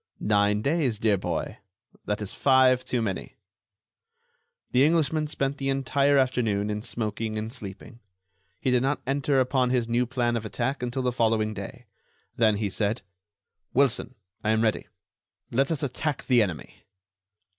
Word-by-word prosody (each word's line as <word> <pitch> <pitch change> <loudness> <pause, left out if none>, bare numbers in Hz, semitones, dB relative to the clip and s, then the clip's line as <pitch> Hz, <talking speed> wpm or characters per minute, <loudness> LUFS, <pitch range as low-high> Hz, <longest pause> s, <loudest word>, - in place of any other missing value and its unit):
"Nine 105 0 +2
days, 140 -6 +1
dear 110 -1 +2
boy. - - -3 0.5
That 105 0 -2
is 100 - -5
five 130 -2 +4
too 120 -2 -1
many." 100 -4 -4 1.4
The 125 +2 +4
Englishman 155 0 +2
spent 140 -1 -2
the 135 0 -1
entire 140 +1 +2
afternoon 115 -6 +1
in 105 0 -3
smoking 110 -1 -3
and 110 +2 -4
sleeping. 105 -1 -8 0.6
He 130 - 0
did 125 -1 +3
not 135 +3 -1
enter 135 0 +1
upon 130 -1 +2
his 125 -2 +1
new 120 +1 +1
plan 120 -1 0
of 115 - -2
attack 125 +5 -2
until 125 +1 -2
the 125 - +1
following 110 -2 +1
day. - - -8 0.5
Then 110 -2 +3
he 105 0 -1
said: 100 +3 -1 0.7
"Wilson, 135 -1 +2 0.3
I 110 - 0
am 110 0 +3
ready. 110 -1 0 0.6
Let 135 +3 +2
us 155 -3 -1
attack 145 +2 -2
the 125 -3 +4
enemy." 90 -7 -4
125 Hz, 155 wpm, -26 LUFS, 110-135 Hz, 1.4 s, five